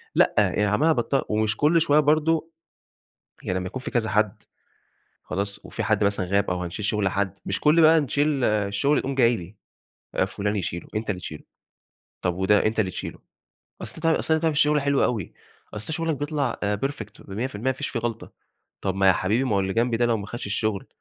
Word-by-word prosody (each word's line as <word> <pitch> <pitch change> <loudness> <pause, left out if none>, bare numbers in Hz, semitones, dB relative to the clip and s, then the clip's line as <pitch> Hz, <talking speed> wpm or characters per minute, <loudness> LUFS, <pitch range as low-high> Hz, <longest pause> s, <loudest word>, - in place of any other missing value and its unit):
لأ، - - +4
يعني 105 - +3
عَمّال 105 +10 +2
على 160 - +4
بطّال 135 +3 +1
ومش 110 0 0
كُلّ 160 +3 +4
شوية 150 -2 +4
برضه 155 +2 +2 0.9
يعني 90 - -1
لمّا 90 - -4
يكون 130 +7 -6
في - - -5
كذا 115 -3 0
حد 105 -2 0 0.8
خلاص، 100 +1 -3
وفي - - -4
حد - - +1
مثلًا 100 -2 +1
غاب 100 +1 +1
أو 90 0 -2
هنشيل 90 +4 -5
شُغل 105 -2 +1
حد، 100 -1 -2
مش 95 - -2
كُلّ 155 +3 +5
بقى 160 +1 +7
نشيل 145 0 0
الشُّغل 105 +7 +1
يقوم 135 0 -2
جاي 120 -2 +4
لي، 90 +3 -10 0.6
آآ - - +2
فُلان 105 +1 -2
يشيلُه، 85 -3 -4
أنت 110 0 -2
اللي 90 -3 -3
تشيلُه، 75 -3 -8 0.8
طَب 90 -2 0
وده 95 +3 +3
أنت 110 +1 0
اللي 95 -4 +1
تشيلُه، - - -6 0.6
أصل 160 - -8
ده 165 0 +2
أصل 160 - +1
أنت 160 - +2
بتعمل 165 -1 +2
الشُّغل 150 0 +3
حلو 140 0 +2
أوي، 110 -8 -1 0.4
أصل 110 +10 -5
شُغلك 165 -1 -1
بيطْلع 145 -3 -2
آآ 105 0 0
Perfect 110 -8 -7
و100% 115 +3 -2
ما - - +1
فيش 130 - -4
فيه 120 - -2
غلْْطة، 115 -1 -4 0.5
طَب 95 -1 -1
ما 95 0 +3
يا 95 - +7
حبيبي 105 +7 +1
ما 110 -6 +1
هو - - +3
اللي 95 0 -2
جنبي 115 +1 +1
ده 120 - +2
لو 115 -1 +2
ما 100 -1 -7
خدش 120 +2 -6
الشُّغل، 100 -1 -2
110 Hz, 210 wpm, -24 LUFS, 100-140 Hz, 0.9 s, بقى